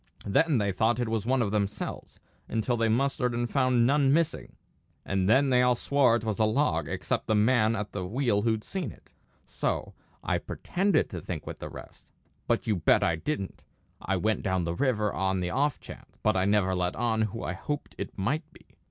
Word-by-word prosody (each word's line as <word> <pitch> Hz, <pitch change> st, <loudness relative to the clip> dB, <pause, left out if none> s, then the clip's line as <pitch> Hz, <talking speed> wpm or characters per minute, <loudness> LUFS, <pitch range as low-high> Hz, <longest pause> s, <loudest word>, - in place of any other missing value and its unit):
Then 150 Hz, +8 st, +3 dB
they 100 Hz, -3 st, +1 dB
thought 110 Hz, +5 st, +1 dB
it 120 Hz, -2 st, -1 dB
was 110 Hz, -1 st, -2 dB
one 130 Hz, -1 st, +2 dB
of 100 Hz, -, -2 dB
themselves, 105 Hz, 0 st, -3 dB, 0.3 s
until 115 Hz, +2 st, 0 dB
they 115 Hz, -1 st, +1 dB
mustered 125 Hz, +1 st, +1 dB
and 120 Hz, 0 st, 0 dB
found 130 Hz, -2 st, +2 dB
none 140 Hz, +1 st, +3 dB
missing; 165 Hz, +2 st, 0 dB, 0.5 s
and 95 Hz, -1 st, 0 dB
then 135 Hz, +4 st, +4 dB
they 125 Hz, 0 st, +5 dB
all 125 Hz, 0 st, +4 dB
swore 130 Hz, -1 st, +3 dB
it 115 Hz, -, -2 dB
was 110 Hz, -2 st, -2 dB
a -, -, +4 dB
log, 110 Hz, -, +1 dB
except -, -, -2 dB
the 110 Hz, -, +2 dB
man 110 Hz, +1 st, +3 dB
at 105 Hz, -1 st, -4 dB
the 95 Hz, -, -4 dB
wheel 110 Hz, +1 st, 0 dB
who'd 110 Hz, -1 st, 0 dB
seen 180 Hz, -, -4 dB
it; -, -, -19 dB, 0.3 s
so -, -, -3 dB, 0.3 s
I -, -, 0 dB
pretended 190 Hz, -1 st, 0 dB
to -, -, -5 dB
think -, -, -5 dB
with -, -, -7 dB
the -, -, -6 dB
rest -, -, -13 dB, 0.4 s
but -, -, +1 dB
you 105 Hz, -3 st, +1 dB
bet 85 Hz, -, +3 dB
I 85 Hz, -, +2 dB
didn't! 100 Hz, -, -4 dB, 0.4 s
I 95 Hz, -, -1 dB
went 110 Hz, +4 st, 0 dB
down 95 Hz, -2 st, 0 dB
the 85 Hz, 0 st, -2 dB
river 105 Hz, -1 st, 0 dB
on 95 Hz, 0 st, 0 dB
the 90 Hz, -1 st, -2 dB
off 140 Hz, +1 st, +1 dB
chance, -, -, -13 dB
but 105 Hz, -, +3 dB
I 95 Hz, 0 st, +2 dB
never 100 Hz, -2 st, +2 dB
let 90 Hz, -1 st, -1 dB
on 110 Hz, -1 st, 0 dB
who 110 Hz, +1 st, -2 dB
I -, -, -2 dB
hoped 145 Hz, -1 st, -5 dB
it -, -, -6 dB
might 150 Hz, -, -2 dB
be. -, -, -19 dB
110 Hz, 210 wpm, -28 LUFS, 100-130 Hz, 0.5 s, they